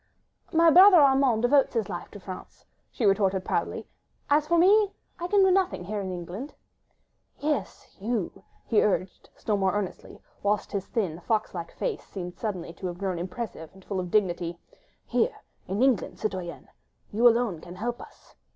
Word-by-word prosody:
"My 330 -1 +5
brother 370 +3 +9
Armand 270 -6 +4
devotes 270 +1 +3
his 220 -4 0
life 175 - -6
to 205 - -11
France," 185 -1 -10 0.2
she 235 - -2
retorted 195 -2 +2
proudly; - - -2 0.4
"as 300 +1 +4
for 340 +1 +3
me, 400 +3 +5 0.3
I 345 - -3
can 400 +1 +4
do 380 - +5
nothing... 370 - +1
here 205 +3 -3
in 190 -1 -4
England... 180 - -7 0.4
." - - -46
"Yes, 295 - -4
you.. 205 -3 -3
." - - -35
he 220 - +3
urged 190 -2 -1
still 210 -2 -1
more 190 -1 +1
earnestly, 205 -3 -5 0.2
whilst 205 +1 0
his 195 -2 -3
thin 180 -8 -2
fox 215 +4 -1
like 170 -2 -6
face 475 -5 -3
seemed 180 -2 -8
suddenly 185 -7 -4
to 185 - -6
have 175 -1 -5
grown 185 -2 -2
impressive 180 -2 -6
and 190 - -17
full 195 -2 -3
of 180 -1 -4
dignity, 175 -4 0 0.5
"here, 460 0 +1 0.3
in 200 +6 0
England, 265 -4 +1
citoyenne... 185 -5 -5 0.4
you 230 +4 +5
alone 230 -8 +2
can 175 +1 -10
help 235 +5 -4
us. - - -16
210 Hz, 180 wpm, -27 LUFS, 185-270 Hz, 0.5 s, brother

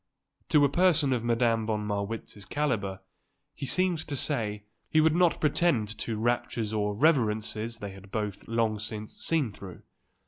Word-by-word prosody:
To 150 -3 +5
a - - +5
person 160 -3 +3
of 120 -2 -1
Madame 115 -2 +1
von 105 -1 -1
Marwitz's 105 0 -4
calibre, 100 -7 -1 0.5
he 135 - -5
seemed 180 +3 +2
to 145 - -3
say, 110 -8 -1 0.3
he 155 - +3
would 155 0 +4
not 175 -1 +3
pretend 140 -9 +1
to 115 -2 -2
raptures 115 -1 -1
or 105 -1 0
reverences 115 -4 +1
they 100 -3 -6
had 95 0 -13
both 105 -1 -4
long 115 -2 0
since 110 0 -6
seen 155 -9 +1
through. 95 -3 -11
115 Hz, 160 wpm, -28 LUFS, 105-145 Hz, 0.5 s, To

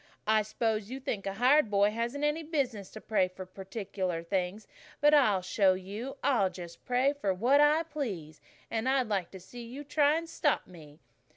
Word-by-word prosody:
I 215 0 +4
s'pose 215 0 -2
you 260 +2 -5
think 230 -8 -4
a 195 - -3
hired 255 +3 +4
boy 205 0 +3
hasn't 235 +6 -3
any 295 +2 +1
business 270 - -2
to 215 - -10
pray 200 -4 +1
for 185 +1 -9
particular 190 -2 -4
things, 185 +4 -2 0.3
but 295 +1 +5
I'll 215 -11 +4
show 185 0 +3
you. 205 +9 -6
I'll 220 -9 +3
just 175 -2 -10
pray 255 +3 +2
for 200 -10 -1
what 255 +9 +4
I 300 +2 +4
please, 210 - -5 0.3
and 225 +3 0
I'd 265 -2 +2
like 195 -5 -1
to 190 - -10
see 240 +7 -11
you 250 +5 -8
try 290 +1 +3
and 330 +1 -3
stop 295 -3 0
me." 155 -4 -15
220 Hz, 190 wpm, -30 LUFS, 190-275 Hz, 0.3 s, but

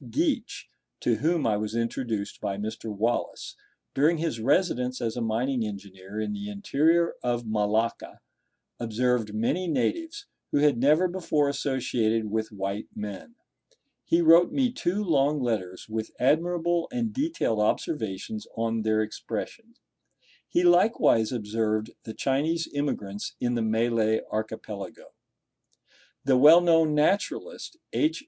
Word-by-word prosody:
Geach - - -1 0.3
(to 115 -2 +1
whom 165 +6 +1
I 110 -2 +2
was 105 +1 -3
introduced 115 -2 -3
by 100 - -2
Mr. 110 +2 -5
Wallace), 110 +2 -2 0.4
during 155 +5 +3
his 160 -7 -2
residence 125 -1 +1
as 115 -2 -2
a 120 - -3
mining 120 +3 0
engineer 100 -1 -7
in 110 - -2
the 205 0 -5
interior 170 -4 +2
of 120 -1 -1
Malacca, 110 +1 -1 0.6
observed 120 -1 0
many 160 +12 0
natives, 330 - -1 0.3
who - - +2
had 145 -4 +3
never 155 +8 +4
before 165 -5 0
associated 120 -6 -1
with 110 0 -2
white 100 +1 -4
men. 105 - -7 0.7
He 170 - +2
wrote 170 +2 +6
me 260 -3 +1
two 205 -3 -1
long 150 -4 +2
letters 105 -8 -3
with 110 0 -4
admirable 170 +4 +1
and 235 -3 -2
detailed 285 - -1
observations 105 - -2
on 115 0 0
their 110 0 +1
expression. 230 - -6 0.7
He 175 - +2
likewise 175 - +4
observed 110 -1 -1
the 110 - -7
Chinese 155 +5 0
immigrants 105 -9 -3
in 120 0 0
the 120 - 0
Malay 110 0 +1
archipelago. 110 -2 -6 1.1
The 135 -2 +4
well 150 +6 +9
known 165 -3 +3
naturalist, 200 - -1 0.2
H. 315 +1 +1
125 Hz, 130 wpm, -27 LUFS, 110-165 Hz, 1.1 s, well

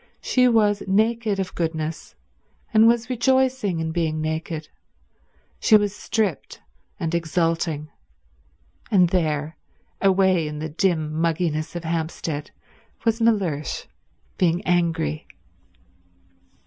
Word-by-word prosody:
She 250 -1 +3
was 210 -4 +3
naked 215 +1 +1
of 190 -1 -3
goodness, 160 -1 -3 0.6
and 220 +1 +6
was 235 0 +2
rejoicing 260 -6 +1
in 160 0 -2
being 160 -2 -1
naked. 160 0 -3 0.9
She 215 - +6
was 205 -1 -1
stripped, 210 -9 -2 0.4
and 165 0 -2
exulting. 165 -2 -1 1.0
And 185 -5 +4
there, 155 -3 -1 0.4
away 190 -4 +3
in 150 0 -5
the 155 +1 -4
dim 160 -1 0
mugginess 165 -1 -1
of 175 - -4
Hampstead, 160 -2 -3 0.6
was 225 0 +1
Mellersh 190 -10 0 0.5
being 175 +2 +1
angry. 165 - 0
170 Hz, 105 wpm, -23 LUFS, 160-210 Hz, 1.0 s, and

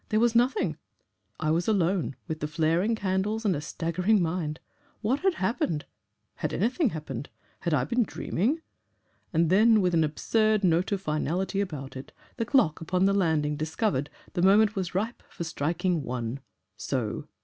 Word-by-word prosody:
There 215 - +2
was 235 0 +3
nothing, 235 - +2 0.6
I 155 - +1
was 170 +2 +1
alone, 185 -7 +1
with 160 -2 -4
the 150 - -2
flaring 165 +8 +1
candles 205 +2 -1
and 195 - +3
a 145 - -3
staggering 180 +6 +1
mind. 165 -3 -1 0.4
What 240 +6 +1
had 380 +1 +2
happened? 185 -6 -1 0.5
Had - - -2
anything 245 - +1
happened? 145 - -6 0.3
Had 170 -3 0
I 125 - +2
been 235 - +1
dreaming?... 240 - -1 0.7
And 165 0 +2
then, 220 +3 +6
with 180 -3 +1
an 165 -1 +4
absurd 215 +7 +1
note 175 +2 +2
of 200 -2 0
finality 180 +5 -1
about 140 -9 -5
it, 130 - -9 0.2
the 230 - -1
clock 220 - +2
upon 180 +3 +1
the 195 - +3
landing 160 -6 +1
discovered 155 - -1 0.2
the 175 - 0
moment 205 +3 +5
was 185 -3 -3
ripe 220 +5 -2
for 170 - -6
striking 165 +2 -1
ONE. 125 -1 -4 0.4
So! 125 +3 -3
180 Hz, 165 wpm, -27 LUFS, 155-215 Hz, 0.7 s, then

